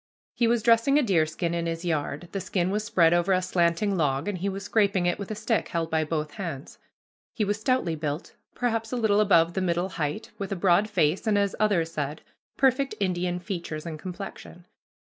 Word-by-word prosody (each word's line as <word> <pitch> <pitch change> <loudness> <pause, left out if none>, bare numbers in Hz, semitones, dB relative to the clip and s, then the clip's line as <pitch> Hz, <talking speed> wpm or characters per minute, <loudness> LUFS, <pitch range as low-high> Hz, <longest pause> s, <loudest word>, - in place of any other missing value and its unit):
He 235 - +2
was 235 -1 +2
dressing 230 +5 +4
a 300 - +4
deerskin 170 -4 +1
in 170 0 -1
his 165 +1 -4
yard. 155 0 -2
The 195 - -3
skin 185 -1 -1
was 210 +1 -1
spread 175 -7 +3
over 175 +2 +2
a 185 - +2
slanting 175 +3 +1
log, 145 -1 0
and 200 -3 -2
he 195 +3 -1
was 195 +1 -5
scraping 200 -3 +2
it 175 +2 0
with 200 - -6
a 215 - -3
stick 220 +1 0
held 165 -1 -2
by 160 -1 +2
both 150 -1 -2
hands. 155 -7 -6 0.6
He 215 - +1
was 205 +1 -1
stoutly 255 -9 +1
built, 150 0 -4 0.2
perhaps 225 -2 -1
a - - -1
little 215 -3 +3
above 170 -5 +4
the 190 - -1
middle 175 +1 0
height, 170 +7 -4
with 200 -1 -4
a - - 0
broad 190 +3 +3
face, 180 0 +1
and, 210 -1 +3
as 200 -1 +1
others 185 -6 +2
said, 150 0 -4 0.4
perfect 270 +1 +2
Indian 180 -2 0
features 175 -5 -5
and 160 -2 -6
complexion. 180 -1 -8
185 Hz, 205 wpm, -26 LUFS, 165-210 Hz, 0.6 s, dressing